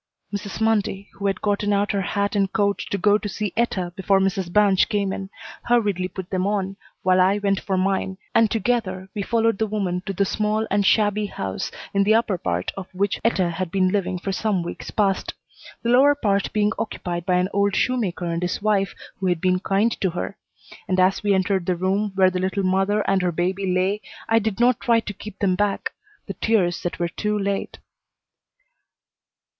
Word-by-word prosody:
Mrs. 200 0 -5
Mundy, 210 -3 0
who 200 - -3
had 195 -1 -2
gotten 205 0 +1
out 205 0 +2
her 200 - 0
hat 200 +2 -1
and 195 -1 +1
coat 200 -2 +1
to 200 - -1
go 205 +2 +3
to 205 - -4
see 205 -1 -3
Etta 190 -7 -1
before 195 0 +2
Mrs. 190 -2 0
Banch 200 -1 +4
came 200 -2 0
in, 195 0 -6 0.4
hurriedly 205 -6 +2
put 185 0 -8
them 185 0 0
on, 195 -2 -1 0.3
while 185 0 +4
I 190 +2 +4
went 200 -1 +1
for 190 -2 -2
mine, 190 0 0 0.2
and 225 -1 +4
together 200 -5 -1
we 210 - -3
followed 225 0 +1
the 220 - +1
woman 195 -4 -2
to 195 - -2
the 200 +2 +1
small 215 +2 0
and 200 +1 +3
shabby 210 +1 +2
house 95 - -4 0.2
in 200 0 +3
the 215 +2 +4
upper 220 -5 +1
part 90 - -2
of 195 -2 -6
which 200 +1 0
Etta 190 -6 +2
had 180 +1 -3
been 185 +1 +2
living 190 -2 0
for 195 +2 -3
some 190 -1 0
weeks 170 - -7
past; 195 -3 0 0.5
the 235 - 0
lower 275 +4 +6
part 200 -7 0
being 210 0 +2
occupied 175 -6 -3
by 180 - +3
an 180 +1 +1
old 200 0 +2
shoemaker 210 -9 0
and 170 0 -2
his 180 0 -1
wife 200 -2 +1 0.2
who 190 - -1
had 175 -2 +1
been 185 +1 +2
kind 195 +4 +1
to 190 - +2
her; 180 +3 -4 0.5
and 185 0 +1
as 185 +1 +3
we 205 -1 +2
entered 190 -1 0
the 180 - +2
room 195 +4 0
where 190 -1 +4
the 180 - -2
little 190 +2 -1
mother 195 +3 +1
and 195 -1 +2
her 180 -1 +1
baby 185 +3 -1
lay 190 +3 +1 0.3
I 225 0 +4
did 220 -1 -2
not 245 0 +4
try 235 -1 +3
to 210 - -6
keep 210 +1 -10
them 195 -2 +1
back 200 +2 0 0.3
the 195 - -5
tears 190 -5 +1
that 175 - -3
were 175 - 0
too 210 +5 -2
late. 200 -1 -2
195 Hz, 205 wpm, -23 LUFS, 185-210 Hz, 0.5 s, lower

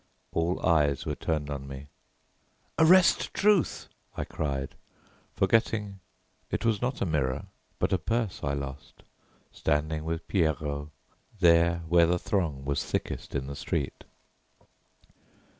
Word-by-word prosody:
All 85 +2 0
eyes 75 -5 +3
were - - -1
turned 75 -3 -2
on 70 -1 -5
me. 70 +1 -8 0.9
"Arrest 180 +3 +5
Truth!" 205 -4 +2 0.3
I - - -1
cried, 70 -3 -3 0.6
forgetting 105 -3 +1 0.5
it - - -2
was 110 -3 +2
not 125 +1 -2
a - - +1
mirror 70 -6 -1 0.3
but - - 0
a 95 - +2
purse 115 +2 -1
I 70 - 0
lost, 70 0 -7 0.5
standing 75 +1 -1
with 80 +1 -4
Pierrot, 75 -5 0 0.5
there, 85 -1 +4
where 85 0 +5
the 90 +1 +2
throng 80 -8 -1
was 70 0 0
thickest - - -4
in 65 -1 -1
the 70 +1 -6
street. - - -3
80 Hz, 125 wpm, -28 LUFS, 70-95 Hz, 0.9 s, Arrest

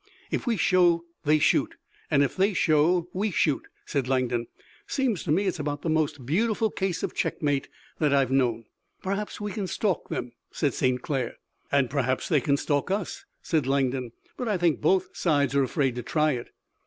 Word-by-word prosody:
"If - - -2
we 230 -3 +2
show 175 -3 +3 0.2
they 155 +1 +5
shoot, 150 - +2 0.3
and 140 -1 +4
if 140 - -1
they 195 +1 +2
show 165 +3 +3
we 205 +4 0
shoot," 155 -6 +1 0.2
said 135 -4 -1
Langdon. 125 -3 0 0.4
"Seems 260 - 0
to 155 - 0
me 190 +6 +2
it's 185 -4 -1
about 145 0 -3
the 165 - 0
most 150 -4 0
beautiful 215 - +1
case 190 -3 -2
of - - -2
checkmate 145 -3 -1 0.3
that 150 -3 +2
I've 135 -2 +3
known." 120 -4 +1 0.4
"Perhaps 200 +2 -3
we 210 0 -3
can 200 -2 -3
stalk 190 -2 -1
them," 120 - -3 0.2
said 145 - -1
St. 125 -1 0
Clair. 130 -5 -2 0.4
"And 140 -2 +3
perhaps 130 -1 -1
they 150 -6 +3
can 140 +2 +2
stalk 145 +3 0
us," 195 0 -3 0.2
said 155 -6 0
Langdon. 130 -3 0 0.3
"But 250 - -3
I 210 -3 +1
think 170 -3 +1
both 185 +4 +2
sides 145 -6 +1
are 140 - +4
afraid 135 0 +1
to - - -2
try 155 +5 +1
it." 120 -4 -4
150 Hz, 190 wpm, -26 LUFS, 135-185 Hz, 0.4 s, they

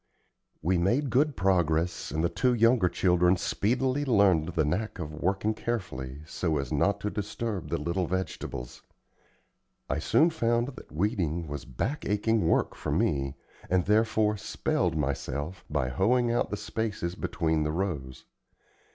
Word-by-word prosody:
We 90 +2 +2
made 120 +10 +1
good 145 +3 +3
progress, 85 -3 +1
and 80 +2 -1
the - - +4
two 125 -1 +1
younger 115 -4 +4
children 90 0 +3
speedily 130 +10 0
learned 100 - +4
the 85 -3 0
knack 100 +9 -2
of 75 -4 -5
working 95 +7 0
carefully, 75 - -4
so 80 -1 -1
as 70 +1 -3
not 100 +7 +2
to 105 - -2
disturb 105 -1 -4
the - - 0
little 85 +4 -1
vegetables. 90 -9 -4 1.1
I - - -1
soon 160 - +3
found 120 -4 +1
that 130 - -12
weeding 85 -2 -1
was 75 -1 -6
back 130 - -3
aching 105 -2 +1
work - - +2
for - - -5
me, 70 0 0 0.3
and 90 -1 +2
therefore 110 0 +2
"spelled" 90 -3 -1
myself 70 +4 -3
by 75 -4 0
hoeing 115 - +2
out 120 - +1
the - - -3
spaces 105 -6 -3
between 80 -3 -1
the 75 0 0
rows. 75 -8 -3
95 Hz, 150 wpm, -28 LUFS, 80-110 Hz, 1.1 s, the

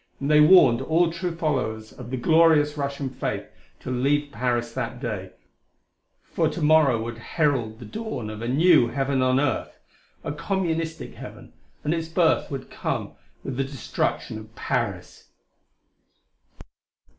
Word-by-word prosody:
And 140 +2 -1
they 150 0 +7
warned 150 -7 +7
all 165 +4 +2
true 170 0 -4
followers 125 -9 -2
of 125 -2 -10
the 130 - -3
glorious 155 +1 +4
Russian 140 -1 -3
faith 130 - -4 0.4
to - - -5
leave 145 +3 +1
Paris 120 -2 -1
that 120 +2 -4
day, 105 -7 -5 0.9
for - - 0
to - - -6
morrow 150 -6 +5
would 115 0 -6
herald 125 -5 0
the 120 - -10
dawn 220 - -5
of 110 0 -8
a 115 - -3
new 155 0 +5
heaven 135 +2 -1
on 130 +1 +3
earth 145 -1 -1 0.5
a - - -3
Communistic 165 0 -2
heaven - - -11 0.3
and 150 - 0
its 165 -1 -2
birth 165 0 +2
would 135 -3 -6
come - - -3 0.3
with 130 -2 -5
the 135 - +1
destruction 130 -4 -3
of 110 +1 -14
Paris.... - - -3
140 Hz, 145 wpm, -24 LUFS, 120-160 Hz, 0.9 s, they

